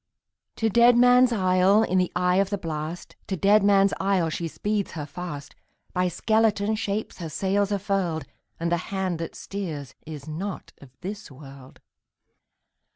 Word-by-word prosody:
To 225 - 0
Deadman's 245 +2 +6
Isle, 190 0 +4
in 185 -3 +1
the 180 - 0
eye 180 +1 +2
of 195 0 +2
the 200 - -1
blast, 160 -1 -5
To 190 - -2
Deadman's 200 +1 +4
Isle, 190 -4 +1
she 165 +1 -3
speeds 205 +4 -2
her 155 -4 -5
fast; 150 -2 -7 0.4
By 180 0 +1
skeleton 220 +1 +1
shapes 210 -1 -3
her 165 -2 -5
sails 200 +5 0
are 200 - +2
furled, 185 -6 -1 0.3
And 170 +1 -1
the 175 - +3
hand 190 -4 -2
that 165 - -5
steers 155 -9 -6
is 150 -3 -8
not 180 +6 -5
of 140 - -13
this 205 +3 -6
world! 135 -1 -13
190 Hz, 155 wpm, -25 LUFS, 165-205 Hz, 0.4 s, Deadman's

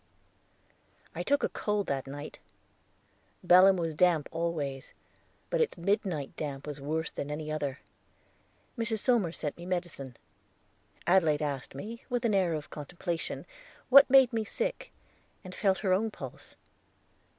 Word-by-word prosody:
I - - -4
took 285 0 +1
a - - +2
cold 210 -1 -1
that 135 -1 -2
night. 145 +2 -8 1.1
Belem 185 +2 +7
was 165 -2 -2
damp 165 -2 +3
always, 155 -5 -3 0.6
but - - +2
its 465 - 0
midnight 175 -5 -1
damp 140 -2 -5
was 145 -2 -6
worse 160 +3 -2
than 140 - -5
any 155 +1 -4
other. 145 -3 -3 0.9
Mrs. 225 -2 -1
Somers 215 -7 +1
sent 150 - -3
me 175 - -8
medicine. 170 -9 -4 0.9
Adelaide 165 -5 +3
asked 140 -3 -4
me, 225 +11 -7
with 245 -1 -1
an 220 - +2
air 185 -4 +2
of 150 -1 -7
contemplation, 170 +3 -4 0.4
what 275 +1 +9
made 265 -2 +6
me 225 -1 0
sick, - - -3 0.5
and 185 -1 -9
felt 190 -1 +2
her 185 - +4
own 220 +4 +1
pulse. - - -9
175 Hz, 140 wpm, -30 LUFS, 150-210 Hz, 1.1 s, what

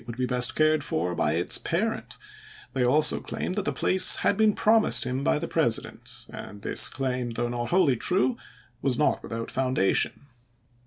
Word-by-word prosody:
would 115 0 -8
be 125 - -1
best 125 -1 +2
cared 155 -1 +2
for 90 - -2
by 75 -3 0
its 85 +2 +1
parent; - - -3 0.6
they 130 -1 0
also 150 +5 +2
claimed - - -5
that 205 0 -3
the - - 0
place 185 0 +5
had - - +3
been 215 0 +2
promised 220 0 +3
him 130 +2 -3
by 70 - +1
the - - -4
President, - - -2
and 100 0 -10
this - - +4
claim, 125 -2 -3
though 120 +1 -3
not 120 0 -4
wholly 175 -8 +2
true, 190 - 0 0.5
was 130 -3 -1
not 150 - +1
without 115 0 -6
foundation. 130 -7 0
130 Hz, 175 wpm, -25 LUFS, 120-155 Hz, 0.6 s, place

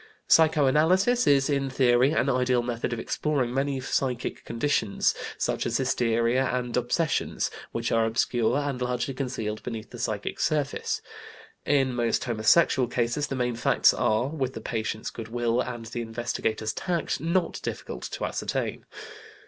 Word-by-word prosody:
Psycho 155 -2 +5
analysis 185 - +3
is, 135 -1 +4
in 140 -2 0
theory, 130 0 +3
an 140 -4 +1
ideal 125 -2 +2
method 120 -1 -3
of 120 - -2
exploring 130 0 -1
many 135 0 0
psychic 125 -1 -2
conditions, 115 -4 +1 0.2
such - - -1
as 115 0 0
hysteria 120 -1 +1
and 125 -2 -2
obsessions, 135 +6 0 0.2
which 115 0 -2
are 115 -1 +3
obscure 115 +2 +1
and 140 -3 -2
largely 125 +1 -1
concealed 125 -5 -3
beneath 115 -3 -6
the - - -9
psychic - - -3
surface. 145 -2 -1 0.6
In 135 -3 +2
most 120 -1 0
homosexual 125 +3 +3
cases 120 +5 -1
the 135 - -3
main 125 -2 -1
facts 115 - +4
are, 110 +3 +1
with 135 -4 -2
the - - -4
patient's 110 -1 -3
good 115 -2 -7
will 120 +1 0
and 120 -3 -5
the 115 +1 -5
investigator's 115 -1 -2
tact, 175 -6 -2
not 170 +4 0
difficult - - -5
to - - -2
ascertain. - - -3
125 Hz, 150 wpm, -26 LUFS, 115-140 Hz, 0.6 s, Psycho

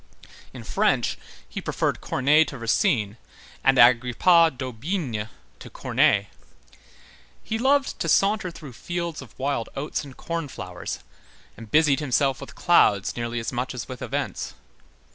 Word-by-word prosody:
In - - -10
French, - - +1 0.3
he - - -6
preferred - - -1
Corneille 150 +4 +3
to 140 - -7
Racine, 115 - +1 0.5
and 135 0 +4
Agrippa 125 +8 +5
d'Aubigné 130 - -4 0.3
to - - -10
Corneille. 100 0 +2 1.2
He 220 - -3
loved 270 +2 +2
to 165 - -1
saunter 200 +2 +2
through 155 -6 -11
fields 170 +4 -4
of 130 -5 -14
wild 135 -3 -2
oats 150 +2 -3
and 135 -2 -12
corn 165 -2 -4
flowers, 90 - -7 0.5
and 115 -1 -11
busied 150 +1 +4
himself 135 -2 +1
with - - -10
clouds 105 - +3
nearly 120 0 -3
as 115 +2 -4
much 125 +1 -3
as 125 - -5
with 130 -2 -8
events. - - -4
135 Hz, 140 wpm, -24 LUFS, 120-165 Hz, 1.2 s, Agrippa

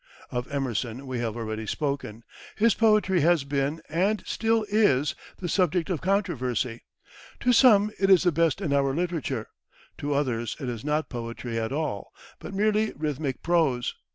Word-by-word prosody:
Of 125 +1 -4
Emerson 130 -2 -2
we 130 -2 -4
have 115 -1 -3
already 110 -1 -4
spoken. 135 -6 -3 0.3
His 225 0 +4
poetry 215 -5 +3
has 165 -1 +3
been, 140 +3 -2
and 190 +7 0
still 225 -1 +1
is, 200 -10 +3 0.2
the 180 - -4
subject 180 0 +1
of 165 - -2
controversy. 130 - -1 0.6
To 250 - +3
some, 215 -5 +6
it 195 0 +2
is 190 -2 +6
the 175 - +3
best 165 +2 +1
in 155 -7 -1
our 140 -1 +2
literature; 160 -9 -2 0.5
to 145 0 -1
others, 120 -5 -1
it 135 - -5
is 115 -3 -5
not 150 +1 -1
poetry 115 -1 -4
at 110 +1 -2
all, 145 -8 -3 0.3
but - - -8
merely 215 +2 +1
rhythmic 145 -3 -3
prose. 155 -8 +1
150 Hz, 160 wpm, -26 LUFS, 125-190 Hz, 0.6 s, some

